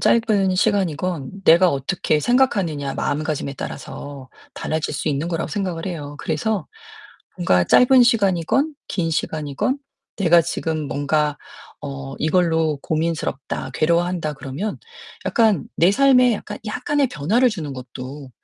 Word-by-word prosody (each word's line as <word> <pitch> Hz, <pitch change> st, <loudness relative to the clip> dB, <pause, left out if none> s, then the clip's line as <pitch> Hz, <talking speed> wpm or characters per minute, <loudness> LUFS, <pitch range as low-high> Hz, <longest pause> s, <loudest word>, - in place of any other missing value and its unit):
짧은 205 Hz, -5 st, +3 dB
시간이건 185 Hz, -3 st, -1 dB
내가 175 Hz, +2 st, +6 dB
어떻게 150 Hz, +2 st, 0 dB
생각하느냐 185 Hz, -, +1 dB
마음가짐에 150 Hz, -2 st, -2 dB
따라서 140 Hz, -1 st, -7 dB, 0.3 s
달라질 155 Hz, -1 st, -2 dB
수 145 Hz, -, -2 dB
있는 150 Hz, +3 st, -1 dB
거라고 165 Hz, -1 st, -2 dB
생각을 180 Hz, -2 st, -3 dB
해요. 145 Hz, -5 st, -6 dB
그래서 190 Hz, +6 st, -2 dB, 0.7 s
뭔가 90 Hz, -, +3 dB
짧은 250 Hz, -, +6 dB
시간이건 230 Hz, -, +2 dB
긴 165 Hz, -3 st, -1 dB
시간이건 155 Hz, -, -1 dB, 0.4 s
내가 175 Hz, -3 st, +5 dB
지금 155 Hz, -2 st, -3 dB
뭔가 150 Hz, +2 st, 0 dB, 0.4 s
어 135 Hz, -1 st, -6 dB
이걸로 160 Hz, -2 st, +1 dB
'고민스럽다. 160 Hz, -4 st, -2 dB
괴로워한다.' 170 Hz, -1 st, +1 dB
그러면 140 Hz, +11 st, -5 dB, 0.5 s
약간 220 Hz, -8 st, +3 dB
내 175 Hz, +4 st, +4 dB
삶에 250 Hz, -2 st, +5 dB
약간 -, -, -7 dB
약간의 285 Hz, +6 st, 0 dB
변화를 225 Hz, -, +2 dB
주는 160 Hz, -9 st, -5 dB
것도 130 Hz, +2 st, -8 dB
165 Hz, 305 characters per minute, -21 LUFS, 145-200 Hz, 0.7 s, 내가